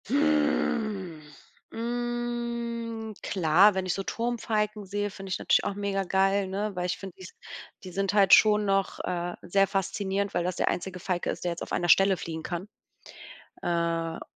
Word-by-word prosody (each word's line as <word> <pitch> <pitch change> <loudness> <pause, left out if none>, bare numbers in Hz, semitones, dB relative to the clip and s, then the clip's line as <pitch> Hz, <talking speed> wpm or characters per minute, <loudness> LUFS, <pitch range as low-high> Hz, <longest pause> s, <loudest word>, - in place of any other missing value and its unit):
Hm, 230 - +1 0.5
hm, 235 -1 -3
klar, 185 +3 +4
wenn 190 -1 -1
ich 180 - 0
so 195 - -3
Turmfalken 215 -1 -2
sehe, 205 +1 -2
finde 195 0 -9
ich 190 - -1
natürlich - - +2
auch 200 - -2
mega 200 -1 -1
geil, 195 +1 +2
ne? 205 +3 -2
Weil 180 0 -1
ich 180 - -2
finde, 190 -3 -9
die - - -10
s 175 - -10 0.5
die 185 - -8
sind 195 +1 -1
halt 200 -2 +6
schon 210 -1 +6
noch, 195 -1 0
äh, 175 -1 -3
sehr 195 +3 +3
faszinierend, 195 +1 -1
weil 175 - 0
das 180 0 -2
der - - +1
einzige 185 +1 -3
Falke 180 -1 -2
ist, - - -4
der 175 - 0
jetzt 170 - -6
auf - - -6
einer 175 0 0
Stelle 195 +3 +6
fliegen 160 -1 -5
kann. 175 +3 -5 0.9
Äh. 165 -1 -1
195 Hz, 175 wpm, -27 LUFS, 180-215 Hz, 0.9 s, halt